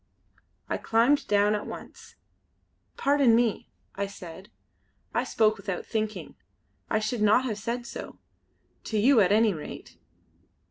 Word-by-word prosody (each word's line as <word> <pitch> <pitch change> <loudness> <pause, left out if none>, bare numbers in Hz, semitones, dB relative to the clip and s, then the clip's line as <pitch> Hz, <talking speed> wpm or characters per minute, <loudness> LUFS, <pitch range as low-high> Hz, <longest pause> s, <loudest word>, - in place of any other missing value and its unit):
I - - -1
climbed 240 +6 +2
down 205 0 +3
at 210 - -3
once. - - -10 0.8
"Pardon 275 -4 +4
me!" 230 -2 0 0.2
I 200 0 -3
said 190 0 -11 0.6
"I - - +1
spoke 215 -1 +2
without 195 -2 -5
thinking. 215 -1 -3 0.6
I 220 - +2
should 215 +1 -2
not 215 +5 +4
have 215 -5 -3
said 235 +3 -3
so - - -8 0.7
to 220 - -2
you 245 +4 +5
at 190 -1 +3
any 215 0 +4
rate." 155 - -9
215 Hz, 135 wpm, -27 LUFS, 205-235 Hz, 0.8 s, you